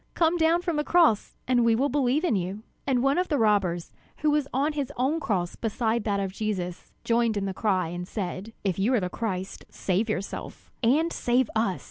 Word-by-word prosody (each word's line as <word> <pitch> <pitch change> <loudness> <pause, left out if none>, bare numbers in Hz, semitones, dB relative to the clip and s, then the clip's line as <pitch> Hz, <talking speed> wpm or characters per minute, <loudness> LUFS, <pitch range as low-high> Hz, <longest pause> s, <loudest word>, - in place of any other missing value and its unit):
Come 330 0 +3
down 335 +1 +3
from 340 -4 -1
the 295 - +1
cross, 325 -11 +3
and 245 -1 +3
we 230 -1 +4
will 265 +5 +2
believe 280 +2 +1
in 340 -11 +2
you!" 190 +3 -3 0.2
And 255 -2 +2
one 275 +5 +3
of 365 - 0
the 295 - +1
robbers, 200 -7 +1 0.3
who 305 -1 +3
was 295 -2 +1
on 285 +4 +1
his 285 -3 -3
own 270 +6 +1
cross 185 - -1
beside 225 0 -1
that 200 -2 +1
of 195 -1 -2
Jesus, 190 -5 -4
joined 230 -2 +2
in 200 - -1
the 195 - -2
cry, 185 -4 0
and 175 +1 -5
said: 190 +1 -4
"If 195 -3 -1
you 230 +7 +3
are - - +3
the 180 -2 -2
Christ, 190 -5 -4
save 200 +4 -1
yourself 200 -2 -5
and 295 +8 +3
save 245 -1 +1
us!" 210 -5 +1
225 Hz, 210 wpm, -26 LUFS, 195-280 Hz, 0.3 s, we